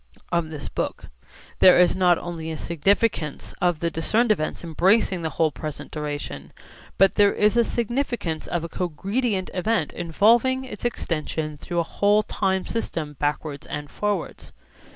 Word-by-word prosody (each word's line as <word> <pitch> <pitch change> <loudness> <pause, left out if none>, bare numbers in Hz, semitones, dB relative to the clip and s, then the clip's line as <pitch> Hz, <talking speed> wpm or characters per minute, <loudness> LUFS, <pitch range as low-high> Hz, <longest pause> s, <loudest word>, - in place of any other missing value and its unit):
74) 170 - +4
of 160 -2 -5
this 150 -3 -6
book. - - -3 0.5
There 185 - +8
is 180 0 +5
not 180 -2 +4
only 165 -2 -5
a 160 - -4
significance 170 0 0
of 175 -3 +1
the 170 0 0
discerned 215 +9 +1
events 155 -5 -1
embracing 185 +3 +2
the 160 - -2
whole 155 +1 +1
present 150 +2 -7
duration, 145 - -5 0.4
but 195 0 +5
there 205 -1 +4
is 210 +1 +3
a 235 - +5
significance 235 - -2
of 175 -2 -2
a - - -3
cogredient 190 - -2
event 190 -3 0
involving 235 +10 +2
its 225 -3 -8
extension 155 -8 -2
through 170 +3 -2
a - - -1
whole 205 +5 +2
time 190 -3 -1
system 165 -9 -3
backwards 145 -1 -2
and 145 0 -6
forwards. 205 -4 -3
175 Hz, 155 wpm, -24 LUFS, 155-210 Hz, 0.5 s, There